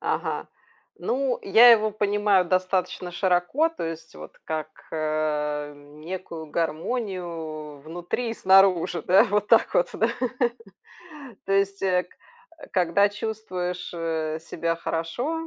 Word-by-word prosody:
Ага. - - -2 0.5
Ну, 260 -1 -1
я 225 +5 +8
его 215 -2 +4
понимаю 205 -2 +2
достаточно 185 0 -1
широко, 185 - +2
то 330 - -6
есть 165 0 -7
вот - - -11
как, 155 -1 -3 0.2
э, 150 -1 -1
некую 160 +3 -8
гармонию 165 - -4
внутри 175 +9 -4
и - - -4
снаружи, 190 -4 +4
да, 190 +3 +6
вот 210 -2 0
так 230 +1 +4
вот, 175 - +2
да. 225 - +1 1.4
То 195 - -1
есть, 195 0 +1
э, 180 -2 +2
к - - -24 0.6
когда 185 +2 +3
чувствуешь, 195 -4 -4
э, 160 -2 -2
себя 165 +1 -2
хорошо, 240 - -3
180 Hz, 120 wpm, -25 LUFS, 160-205 Hz, 1.4 s, я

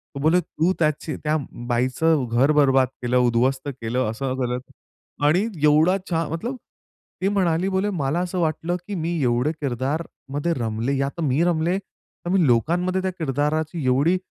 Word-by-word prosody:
तो - - -4
बोले, 160 +4 +4
"तू 170 +2 0
त्याची 155 -1 0
त्या 155 +1 +1 0.3
बाईचं 130 +5 +1
घर 130 +5 +4
बरबाद 135 -3 +4 0.2
केलं, 125 +1 +2
उध्वस्त 125 +3 +2
केलं, 115 +3 -1
असं 130 +3 -3
केलं" 125 0 -1 0.7
आणि 155 +5 +4 0.2
एवढा 155 +5 +5
छान 165 -2 0
मतलब 235 +11 -3 0.7
ती 190 - +2
म्हणाली, 185 -2 +1
बोले 190 +2 0
"मला 155 -4 -1
असं 180 +1 -2
वाटलं, 165 +1 0
की 205 - -4
मी 170 0 -2
एवढे 125 +4 +2
किरदारमध्ये 145 +3 -2
रमले 115 +3 -1
आता 140 +5 -5
मी 140 +4 +2
रमले. 175 +1 +1
तर 185 -2 -13
मी 190 -3 +3
लोकांमध्ये 175 +10 +1
त्या 190 0 -1
किरदाराची 155 +2 -1
एवढी 140 +8 +3
155 Hz, 155 wpm, -23 LUFS, 130-170 Hz, 0.7 s, एवढा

